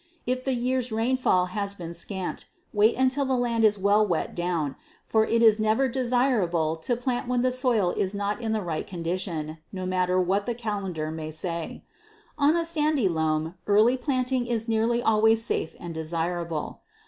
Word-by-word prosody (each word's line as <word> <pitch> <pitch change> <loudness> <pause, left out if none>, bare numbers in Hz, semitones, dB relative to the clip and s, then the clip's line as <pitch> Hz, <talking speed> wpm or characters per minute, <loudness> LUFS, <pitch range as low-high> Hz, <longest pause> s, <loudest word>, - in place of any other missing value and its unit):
If 255 +1 -1
the 265 -1 +1
year's 250 0 -1
rainfall 225 -5 +2
has 200 -1 -2
been 170 -3 -7
scant, 185 +2 -5 0.3
wait 215 +2 +4
until 260 +2 +2
the 265 -1 0
land 235 -2 0
is 210 -1 +4
well 200 +2 +3
wet 175 -6 -1
down, 170 -5 -2 0.3
for 220 0 +2
it 230 0 +2
is 220 -1 +6
never 220 +5 +2
desirable 235 - +1
to 240 +10 -1
plant 245 0 -2
when 250 0 +1
the 255 - +2
soil 245 -8 +2
is 195 +1 -2
not 205 +3 -2
in 225 -1 -2
the 215 -2 -1
right 165 -3 -3
condition, 165 -3 -4
no 185 -2 -5
matter 185 0 +1
what 195 +4 0
the 240 - -1
calendar 195 -9 -3
may 160 -1 -5
say. 165 +1 -4 0.5
On 300 +2 +3
a 335 - 0
sandy 305 - +1
loam 160 -1 0
early 215 +5 +5
planting 255 -2 -1
is 230 -1 -2
nearly 230 +2 +1
always 220 +1 +4
safe 160 - -2
and 170 -1 -6
desirable. 165 0 -3
215 Hz, 175 wpm, -26 LUFS, 175-245 Hz, 0.5 s, is